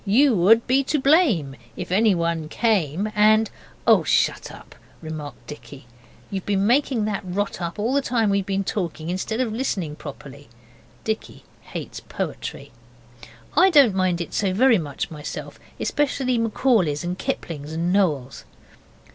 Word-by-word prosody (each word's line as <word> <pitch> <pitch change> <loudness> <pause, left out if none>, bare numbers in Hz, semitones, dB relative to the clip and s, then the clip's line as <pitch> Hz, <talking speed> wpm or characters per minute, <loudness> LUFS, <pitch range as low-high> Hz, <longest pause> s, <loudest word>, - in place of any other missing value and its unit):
You 245 +7 +4
would 220 +5 +5
be 265 +2 +2
to 300 +2 0
blame 260 - +3 0.2
If 180 -1 -6
anyone 170 -6 +1
came 200 -2 0
And 215 +1 +4 0.2
' - - -27
'Oh, - - +6
shut - - +1
up!' - - -13 0.3
remarked 150 -6 -8
Dicky. 145 -2 -11 0.5
'You've 190 -2 -4
been 200 -1 +1
making 245 -1 +2
that 210 -2 -2
rot 190 +1 -3
up 170 -1 -4
all 225 +5 0
the 280 - +3
time 230 -5 +1
we've 200 0 +1
been 195 0 0
talking 170 -4 -3
instead 215 +5 -3
of 240 -4 0
listening 190 - -2
properly.' 140 -2 -10 0.5
Dicky 220 -1 -4 0.2
hates - - -7
poetry. - - -6 0.8
I 375 +2 +6
don't 280 - +6
mind 185 -2 +1
it 170 - -6
so 190 -3 0
very 240 -1 +5
much 145 -2 -5
myself, 150 -2 -7 0.2
especially 265 -4 0
Macaulay's 215 - +1
and 175 +1 -2
Kipling's 150 -4 -4
and 170 +3 -1
Noel's. 150 -10 0
195 Hz, 150 wpm, -23 LUFS, 165-230 Hz, 0.8 s, Oh